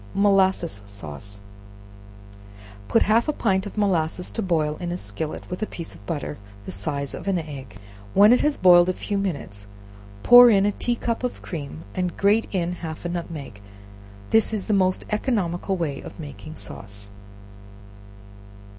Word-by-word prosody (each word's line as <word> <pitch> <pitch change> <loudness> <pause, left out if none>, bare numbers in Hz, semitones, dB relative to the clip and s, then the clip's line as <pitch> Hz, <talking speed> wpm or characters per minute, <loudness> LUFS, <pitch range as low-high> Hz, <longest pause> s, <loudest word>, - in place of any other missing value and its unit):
Molasses 190 - +2
Sauce. 100 +1 -7 1.5
Put - - +4
half 225 +5 +3
a - - +3
pint 195 -5 0
of 205 - -10
molasses 180 -4 0
to 225 - -3
boil 160 -6 0
in 175 -1 -4
a 175 - -2
skillet, 160 -3 -4
with 180 - -6
a 215 - -1
piece 170 - -7
of - - -15
butter 150 -2 -4 0.3
the - - -6
size 140 +9 -3
of - - -7
an 195 -2 +2
egg; 140 -9 -7 0.4
when 205 +4 +8
it 250 - +3
has 300 -1 +1
boiled 175 -1 +6
a - - +1
few 200 +2 -3
minutes, 125 - -4 0.6
pour 245 0 +10
in 200 -3 +4
a 205 - +2
tea 240 +4 -1
cup 235 +1 -3
of 250 - -4
cream, 155 -1 -6
and 180 -2 -2
grate 205 +3 +3
in 175 -3 -1
half 160 0 -7
a - - -1
nutmeg; 155 - -6 0.7
this 220 0 +3
is 205 - -3
the 215 - 0
most 185 -2 +2
economical 195 -5 -1
way 150 -5 -3
of - - -11
making 155 +1 -9
sauce. 100 -5 -8
175 Hz, 165 wpm, -24 LUFS, 150-200 Hz, 1.5 s, pour